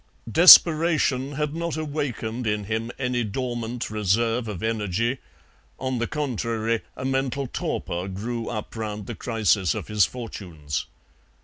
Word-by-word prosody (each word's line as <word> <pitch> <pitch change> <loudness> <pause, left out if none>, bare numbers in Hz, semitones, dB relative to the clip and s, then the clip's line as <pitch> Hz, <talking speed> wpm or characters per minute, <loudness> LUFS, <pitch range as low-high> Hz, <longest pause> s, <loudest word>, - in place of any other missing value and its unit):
Desperation 155 - +7
had 150 +1 -2
not 170 -1 -3
awakened 125 -6 -3
in 105 -1 0
him 110 +3 -3
any 125 -2 -1
dormant 120 +1 -4
reserve 115 +3 +1
of 105 -1 -6
energy; 115 +3 -1 0.6
on 130 -2 -2
the 120 - -1
contrary, 115 -5 -2 0.2
a 130 - -5
mental 135 0 -1
torpor 90 -6 -3
grew 115 +4 -4
up 110 -1 -6
round 105 -2 -4
the - - -5
crisis 105 - +1
of - - -6
his 105 -2 +3
fortunes. 85 -12 -4
115 Hz, 130 wpm, -24 LUFS, 105-130 Hz, 0.6 s, Desperation